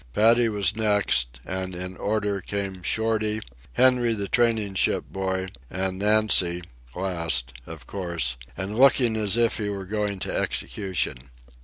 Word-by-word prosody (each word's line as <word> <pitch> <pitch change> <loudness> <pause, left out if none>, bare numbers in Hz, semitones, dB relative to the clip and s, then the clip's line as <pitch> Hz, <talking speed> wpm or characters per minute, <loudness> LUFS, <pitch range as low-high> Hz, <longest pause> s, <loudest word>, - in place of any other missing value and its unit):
Paddy 115 - +4
was 105 -1 0
next, 100 - +1
and 95 -1 -4
in 90 +1 -4
order 105 -1 -1
came 100 -2 -4
Shorty, 110 +3 0 0.3
Henry 125 - +3
the 100 -2 -3
training 115 -3 +1
ship 95 - +1
boy, 95 -1 -2 0.2
and 95 0 -1
Nancy, 105 -4 +3 0.3
last, 85 -10 0
of 80 -5 -10
course, 85 -10 -2 0.2
and 95 +2 -4
looking 130 -4 +5
as 105 0 +2
if 115 -1 +2
he 105 -1 -2
were 100 -1 -5
going 105 0 -2
to - - -3
execution. 90 -10 -2
100 Hz, 140 wpm, -25 LUFS, 90-110 Hz, 0.3 s, looking